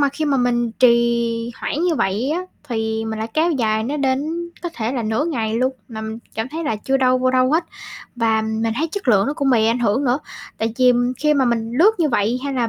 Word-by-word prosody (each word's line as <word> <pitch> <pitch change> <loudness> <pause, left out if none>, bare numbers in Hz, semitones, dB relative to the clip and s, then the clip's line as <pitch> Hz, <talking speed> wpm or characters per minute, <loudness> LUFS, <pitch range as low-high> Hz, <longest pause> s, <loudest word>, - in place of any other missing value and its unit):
mà 285 - +4
khi 305 +3 -3
mà 285 -2 +2
mình 240 -2 +1
trì 235 -1 +2
hoãn - - -2
như 355 -2 +2
vậy 220 +3 0
á, 345 +3 0 0.3
thì 220 -1 -2
mình 220 0 -4
lại 220 - -3
kéo 325 +2 +2
dài 220 -6 0
nó 285 +5 -2
đến, 295 +5 -1
có 345 - -2
thể 225 +1 -2
là 245 -3 -2
nửa 220 +6 0
ngày 230 -9 -2
luôn, 255 +2 +1 0.2
mà 220 -2 -7
mình 220 +1 -5 0.2
cảm 225 +1 -2
thấy 320 +4 -5
là 225 - -1
chưa 270 +6 0
đâu 255 -1 +3
vô 255 0 +2
đâu 255 +1 +3
hết. 330 +2 +2 0.5
Và 225 -2 +2
mình 220 +1 -1
thấy 320 +5 0
chất 405 -8 -4
lượng 205 -3 +4
nó 285 - 0
cũng 275 -2 0
bị 225 -3 +3
ảnh 230 +2 +2
hưởng 235 +3 +1
nữa. 250 +2 +2 0.4
Tại 225 0 -2
vì 250 -1 +6 0.3
khi 300 -1 +3
mà 270 - +3
mình 230 -2 -1
lướt 380 +7 +7
như 325 -3 +2
vậy 235 -1 +1
hay 280 - -2
là 240 -3 0
245 Hz, 250 wpm, -20 LUFS, 225-280 Hz, 0.5 s, lướt